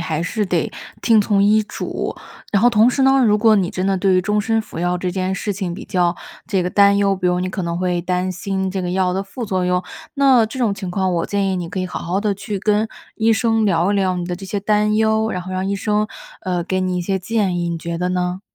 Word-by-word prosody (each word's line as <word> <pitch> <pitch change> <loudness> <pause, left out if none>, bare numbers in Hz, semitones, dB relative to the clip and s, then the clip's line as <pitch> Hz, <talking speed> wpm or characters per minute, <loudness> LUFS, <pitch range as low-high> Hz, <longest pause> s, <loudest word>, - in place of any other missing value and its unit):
还 160 -2 -2
是 205 +4 -1
得 175 -4 -1 0.3
听 225 -2 +4
从 200 -1 +2
医 215 +2 +4
嘱， - - -4 0.4
然 200 +1 +3
后 245 - +7
同 225 0 +5
时 270 - -2
呢， 270 -1 +5
如 210 -2 +3
果 220 0 +5
你 185 -3 +1
真 185 +1 -2
的 195 0 +2
对 190 0 +2
于 185 - +4
终 210 +3 0
身 225 +2 +1
服 215 - -9
药 175 +1 0
这 180 0 -2
件 185 +1 -1
事 205 +1 -2
情 190 -3 -3
比 175 - -7
较 175 -1 +1 0.3
这 195 -4 0
个 180 - -1
担 200 +1 +4
忧， 200 -1 +2
比 185 -1 -1
如 180 0 +1
你 185 - -1
可 190 0 -4
能 170 0 -2
会 180 -1 -1
担 180 +1 -1
心 190 +1 -2
这 190 0 -3
个 180 - -2
药 185 0 +1
的 190 - -1
副 220 +4 -7
作 185 -3 0
用， 180 0 +1 0.3
那 270 -5 +5
这 225 +5 -6
种 230 -5 +1
情 195 -2 -6
况 185 -1 0
我 170 - -1
建 200 -1 0
议 190 - 0
你 175 - -3
可 190 - -4
以 185 - -2
好 - - -5
好 180 +3 -1
地 205 -1 0
去 200 +1 -5
跟 210 +2 +1 0.3
医 225 0 +3
生 225 -1 +2
聊 180 -2 +2
一 - - +1
聊 190 -2 +1
你 175 - -3
的 175 0 -3
这 195 - -9
些 200 +1 -3
担 210 +1 +2
忧， 220 0 +2
然 180 - -3
后 185 +1 -8
让 185 0 -2
医 200 - 0
生， 210 +1 0 0.4
呃， 180 -4 -1
给 185 +2 -2
你 185 -1 -1
一 - - -1
些 190 +2 -1
建 195 -2 0
议， 170 0 -1
你 170 - -3
觉 170 +1 -4
得 180 +1 -1
呢？ 180 0 -2
190 Hz, 295 characters per minute, -20 LUFS, 180-210 Hz, 0.4 s, 后